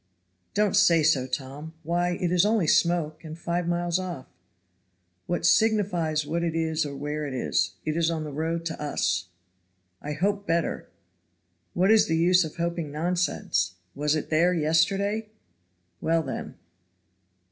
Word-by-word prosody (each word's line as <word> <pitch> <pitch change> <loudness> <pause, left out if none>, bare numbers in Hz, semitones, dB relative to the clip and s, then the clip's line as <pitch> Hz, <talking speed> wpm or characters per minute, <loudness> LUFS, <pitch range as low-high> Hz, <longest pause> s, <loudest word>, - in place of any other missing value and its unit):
"Don't 210 -1 +2
say 175 -6 +5
so, 140 -4 +3
Tom. 140 +4 -6
Why, 175 +2 0
it 180 -3 0
is 180 0 +4
only 210 -3 +2
smoke, 170 0 +1
and 160 0 -8
five 170 0 -2
miles 175 0 0
off." 175 -8 -5 1.0
"What 175 -1 -1
signifies 175 -7 +2
what 170 +3 -2
it 165 -1 -1
is 160 -1 0
or 140 - -7
where 150 +2 -3
it 135 - -5
is? 90 -6 0
It 155 0 -1
is 165 0 +2
on 160 -2 -2
the 150 - -6
road 165 +3 -2
to 165 -2 -4
us." 90 - -1 0.7
"I 150 - -4
hope 200 +5 -1
better." 165 0 -1 0.9
"What 185 +4 +3
is 220 -1 +5
the 160 - +1
use 180 +2 +4
of 160 - -7
hoping 170 -3 -2
nonsense? 155 - -1 0.2
Was 150 +2 0
it 155 - -4
there 175 +3 +3
yesterday? 195 +7 +1 0.7
Well, 165 0 +1
then." - - -6
165 Hz, 155 wpm, -26 LUFS, 150-175 Hz, 1.0 s, say